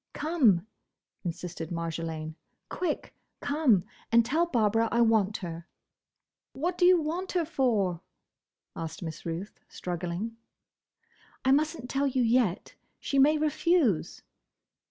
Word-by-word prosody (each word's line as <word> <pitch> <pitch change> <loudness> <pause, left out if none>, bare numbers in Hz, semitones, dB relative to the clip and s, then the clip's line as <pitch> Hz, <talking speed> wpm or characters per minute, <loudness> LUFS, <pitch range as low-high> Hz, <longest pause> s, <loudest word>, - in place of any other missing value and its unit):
"Come!" 255 - +3 0.6
insisted 170 -2 -5
Marjolaine. 165 -2 -4 0.4
"Quick! 350 -4 -3 0.3
Come, 280 - +2 0.3
and 230 0 +5
tell 320 +8 +1
Barbara 225 -5 +2
I 235 - +3
want 220 -2 +3
her." 170 0 -7 0.9
"What 340 +6 -2
do 355 - +3
you 360 -1 +7
want 340 +5 -3
her 350 -3 +1
for?" 220 - 0 0.7
asked 165 +1 -6
Miss 160 0 -6
Ruth, 170 +5 -5
struggling. 180 +5 -4 1.1
"I 265 - +5
must 310 +4 +2
n't 250 - -8
tell 275 +2 0
you 260 -2 +1
yet, 230 -6 +1 0.3
she 275 - 0
may 300 +3 +5
refuse." 305 - +1
230 Hz, 120 wpm, -28 LUFS, -, 1.1 s, you